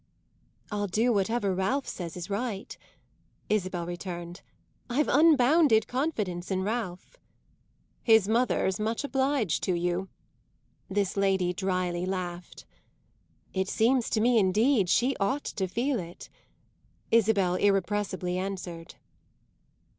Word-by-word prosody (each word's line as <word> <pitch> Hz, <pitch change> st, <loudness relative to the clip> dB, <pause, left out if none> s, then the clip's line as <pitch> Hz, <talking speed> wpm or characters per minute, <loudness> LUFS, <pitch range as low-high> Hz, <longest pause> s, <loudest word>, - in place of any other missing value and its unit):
"I'll 205 Hz, 0 st, -1 dB
do 225 Hz, +6 st, +2 dB
whatever 200 Hz, 0 st, 0 dB
Ralph 195 Hz, +10 st, -1 dB
says 170 Hz, -2 st, -6 dB
is 175 Hz, 0 st, -6 dB
right," 205 Hz, 0 st, -4 dB, 0.7 s
Isabel 185 Hz, -4 st, -1 dB
returned. 175 Hz, 0 st, -6 dB, 0.5 s
"I've 280 Hz, +5 st, +1 dB
unbounded 285 Hz, -5 st, +4 dB
confidence 215 Hz, -, -2 dB
in 190 Hz, -1 st, -1 dB
Ralph." 210 Hz, -, -4 dB, 0.8 s
"His 220 Hz, -4 st, +5 dB
mother's 220 Hz, -4 st, +1 dB
much 225 Hz, +4 st, -1 dB
obliged 270 Hz, -, 0 dB
to 185 Hz, -, +1 dB
you!" 175 Hz, +2 st, -2 dB, 0.8 s
this 200 Hz, -1 st, -1 dB
lady 190 Hz, -2 st, +1 dB
dryly 180 Hz, -1 st, -1 dB
laughed. 180 Hz, -2 st, -5 dB, 0.9 s
"It 190 Hz, 0 st, -1 dB
seems 240 Hz, +2 st, +2 dB
to 215 Hz, -, +1 dB
me 240 Hz, 0 st, +4 dB
indeed 210 Hz, +1 st, +3 dB
she 250 Hz, +8 st, +2 dB
ought 265 Hz, +9 st, 0 dB
to 190 Hz, -2 st, -2 dB
feel 240 Hz, +6 st, -1 dB
it!" 170 Hz, -1 st, -9 dB, 0.8 s
Isabel 205 Hz, -5 st, +3 dB
irrepressibly 190 Hz, -1 st, 0 dB
answered. 185 Hz, -3 st, -6 dB
200 Hz, 110 wpm, -28 LUFS, 180-235 Hz, 0.9 s, His